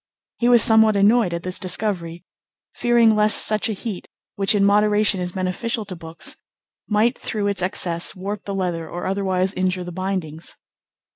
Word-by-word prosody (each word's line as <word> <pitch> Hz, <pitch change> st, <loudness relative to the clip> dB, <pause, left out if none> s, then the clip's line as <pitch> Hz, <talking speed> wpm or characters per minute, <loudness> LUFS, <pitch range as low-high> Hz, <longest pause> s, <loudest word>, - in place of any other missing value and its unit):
He 240 Hz, -, +2 dB
was 240 Hz, -2 st, +7 dB
somewhat 220 Hz, -2 st, +5 dB
annoyed 210 Hz, 0 st, +3 dB
at 170 Hz, 0 st, -4 dB
this 185 Hz, 0 st, -3 dB
discovery, 180 Hz, -4 st, -2 dB, 0.5 s
fearing 235 Hz, -2 st, +3 dB
lest 210 Hz, 0 st, +5 dB
such 215 Hz, +1 st, 0 dB
a -, -, -1 dB
heat, 205 Hz, -2 st, -7 dB, 0.3 s
which 200 Hz, +1 st, +1 dB
in 200 Hz, -1 st, +3 dB
moderation 210 Hz, 0 st, +2 dB
is 180 Hz, 0 st, -4 dB
beneficial 210 Hz, +5 st, -3 dB
to 190 Hz, -2 st, -6 dB
books, 165 Hz, -1 st, -6 dB, 0.5 s
might 220 Hz, +4 st, +1 dB
through 210 Hz, -2 st, -4 dB
its 200 Hz, -2 st, 0 dB
excess 175 Hz, -2 st, 0 dB
warp 200 Hz, +2 st, -6 dB
the 200 Hz, -, -4 dB
leather 175 Hz, -4 st, -3 dB
or 175 Hz, -, -6 dB
otherwise 190 Hz, -1 st, -1 dB
injure 185 Hz, -1 st, -1 dB
the 175 Hz, -, -8 dB
bindings. 180 Hz, -4 st, -4 dB
195 Hz, 165 wpm, -21 LUFS, 180-215 Hz, 0.5 s, was